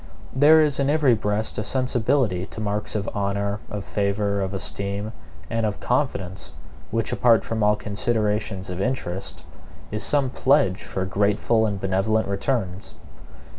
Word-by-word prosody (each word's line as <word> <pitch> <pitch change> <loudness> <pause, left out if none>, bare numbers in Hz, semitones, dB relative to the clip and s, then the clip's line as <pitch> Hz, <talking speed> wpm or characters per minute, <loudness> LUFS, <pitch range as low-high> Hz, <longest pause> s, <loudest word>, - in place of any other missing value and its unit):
There 150 +4 +7
is 150 -3 +2
in 140 0 +2
every 145 -4 +4
breast 105 0 -1
a - - -1
sensibility 120 -5 +1
to - - -8
marks 105 0 -2
of 100 -2 -1
honor, 100 0 -1
of 105 -1 -5
favor, 100 0 0
of 95 -1 -2
esteem, 100 +1 -3 0.4
and 115 +4 -1
of 105 -1 -1
confidence, 100 -8 -2 0.4
which, 115 0 -1
apart 115 -2 +4
from 115 -1 -2
all 105 0 +4
considerations 105 -2 -1
of 90 +1 -4
interest, 100 -7 -3 0.5
is 105 +1 -2
some 140 -3 +2
pledge 125 -10 +2
for 95 - -3
grateful 105 +3 +2
and 100 -2 -3
benevolent 95 +3 +1
returns. 100 -2 -2
105 Hz, 145 wpm, -24 LUFS, 100-120 Hz, 0.5 s, There